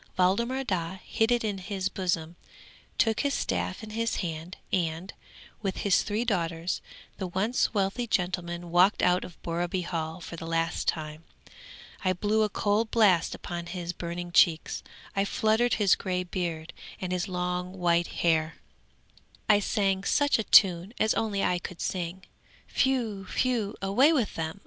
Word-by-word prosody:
Waldemar 235 +9 +2
Daa 185 -5 -2
hid 225 +1 +1
it 240 -1 +2
in 205 -3 -2
his 190 0 -2
bosom, 175 -4 -2 0.6
took 225 -1 +2
his 280 0 +1
staff 90 - -2
in 215 - -8
his 230 +1 -1
hand, 165 0 -4 0.2
and, 170 +1 -1 0.5
with 195 -3 -2
his 200 - +4
three 215 +3 -1
daughters, 170 -5 -1 0.4
the 190 - -2
once 200 +7 0
wealthy 200 +5 0
gentleman 175 -3 -2
walked 180 +4 +4
out 180 0 +3
of 175 - -11
Borreby 175 +2 -1
Hall 165 -1 -3
for 170 - -8
the 165 - -7
last 165 0 -1
time. 155 0 -2 0.8
I 185 -1 +2
blew 210 +4 +1
a 215 - +2
cold 210 +2 +1
blast 200 -8 +3
upon 175 -1 -6
his 175 -1 -4
burning 175 0 -5
cheeks, 165 -2 +3 0.3
I 195 - +2
fluttered 220 +4 +2
his 205 -3 +4
grey 180 -1 -1
beard 175 -3 -4 0.3
and 185 -1 -4
his 180 -1 -1
long 180 0 -2
white 170 -1 +2
hair; 160 -2 +1 0.9
I 210 -1 +6
sang 195 -2 0
such 285 +5 +2
a - - 0
tune 190 +1 +5
as 220 - +3
only 205 -3 0
I 180 - +1
could 180 0 -8
sing. 180 0 -3 0.5
Whew! 235 -7 +1
whew! 230 -5 0
away 245 +11 +5
with 245 -10 +1
them! 160 +4 -4
185 Hz, 160 wpm, -28 LUFS, 170-210 Hz, 0.9 s, I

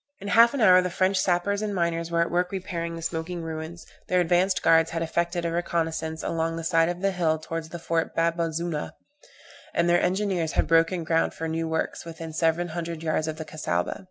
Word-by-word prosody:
In 200 - -6
half 235 +5 +6
an 270 - -1
hour 185 -3 +7
the 180 - -2
French 185 +2 +1
sappers 190 +3 +1
and 210 -2 -2
miners 170 -1 -1
were 170 0 +1
at 170 - 0
work 180 +1 0
repairing 175 -3 -4
the 165 - -7
smoking 165 +1 -3
ruins, 160 +1 -6 0.2
their 180 - +2
advanced 180 +2 +2
guards 165 0 +5
had 165 0 -2
effected 170 +1 -1
a 165 - 0
reconnoissance 160 -2 -2
along 165 0 -1
the 165 - -5
side 165 0 +3
of 175 0 -4
the 195 0 +2
hill 165 -4 +1
towards 160 +1 -6
the 175 - -6
fort 165 0 -2
Bab 165 0 +1
azoona, 165 -1 -2 0.8
and 170 - +2
their 175 0 +4
engineers 185 -4 0
had - - +2
broken 165 +2 +2
ground 165 0 +1
for 165 - -4
new 165 0 -2
works 160 0 -2
within 165 -1 -8
seven 165 +2 +1
hundred 165 -1 -5
yards 155 0 0
of 155 0 -4
the 160 - -6
Cassaubah. 90 - -2
170 Hz, 215 wpm, -26 LUFS, 165-180 Hz, 0.8 s, hour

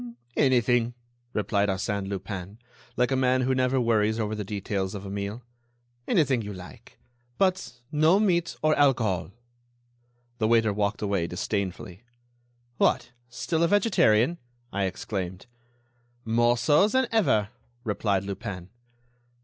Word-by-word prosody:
"Anything," 120 -3 +2 0.4
replied 105 -1 0
Arsène 100 +1 -2
Lupin, 95 0 -6 0.4
like 125 +2 +2
a - - +3
man 130 0 +2
who 130 +1 +1
never 130 0 +1
worries 110 -2 +2
over 110 -1 -1
the 105 -1 -3
details 100 -1 -3
of 100 0 -7
a 95 - -6
meal; 100 +4 -4 0.6
"anything 135 -7 +2
you 105 -1 -6
like, 95 +6 -13 0.4
but 185 -8 +1 0.2
no 155 +6 +4
meat 175 -5 +1
or 155 0 +4
alcohol." 120 -12 +2 1.1
The 110 - +2
waiter 115 -2 +3
walked 100 +1 -1
away, 100 -4 0
disdainfully. 95 0 -4 0.8
"What! - - +2 0.2
still 160 +6 -2
a 170 - +4
vegetarian?" 170 - +3 0.3
I 100 -1 0
exclaimed. 95 -1 -4 0.8
"More 120 +2 +3
so 145 - +4
than 260 +4 +2
ever," 110 - +2 0.3
replied 100 -3 0
Lupin. 95 -2 -6
110 Hz, 125 wpm, -26 LUFS, 100-130 Hz, 1.1 s, no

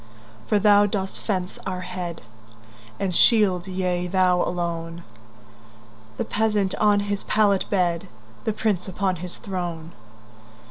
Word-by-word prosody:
For 210 - +3
thou 205 0 +5
dost 195 -1 -3
fence 185 -3 -3
our 185 -1 -3
head, 180 -4 -6 0.8
And 190 -3 -1
shield—yea, 185 -4 +3
thou 180 -1 +3
alone—The 115 -10 -7
peasant 210 -3 0
on 205 -1 +4
his 205 0 -3
pallet 205 -3 +2
bed, 175 -4 0 0.4
The 220 - +1
prince 205 -4 -1
upon 190 0 -1
his 180 +1 -6
throne. 175 -4 -5
180 Hz, 110 wpm, -24 LUFS, 170-200 Hz, 0.8 s, thou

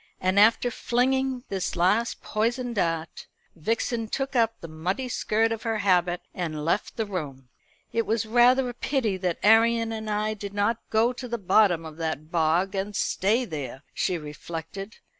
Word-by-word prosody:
And 185 +2 +2
after 230 +3 +5
flinging 260 +2 0
this 190 -2 -2
last 205 +7 +1
poisoned 240 +3 -1
dart, 165 -5 -2 0.3
Vixen 225 +6 -1
took 270 +4 -3
up 230 -1 +2
the 165 - -8
muddy 180 +11 -3
skirt 225 -1 +1
of 225 -1 -3
her 225 -1 -1
habit 180 -3 +2
and 155 -4 -4
left 170 +5 -1
the 225 - 0
room. 145 -10 -6 0.4
"It 230 -1 0
was 225 0 0
rather 245 +3 +4
a 245 - -4
pity 240 -5 -1
that 180 -2 -1
Arion 225 +1 +4
and 220 -1 -4
I 210 +1 0
did 205 -1 -7
not 210 +3 +1
go 225 +3 +3
to 250 0 -7
the 235 0 -2
bottom 190 -4 +3
of 155 -1 -9
that 160 -1 -4
bog 170 +4 +2
and 200 +1 -3
stay 220 +8 +1
there," 145 - -6
she 180 - 0
reflected. 165 +6 -7
210 Hz, 170 wpm, -26 LUFS, 175-230 Hz, 0.4 s, after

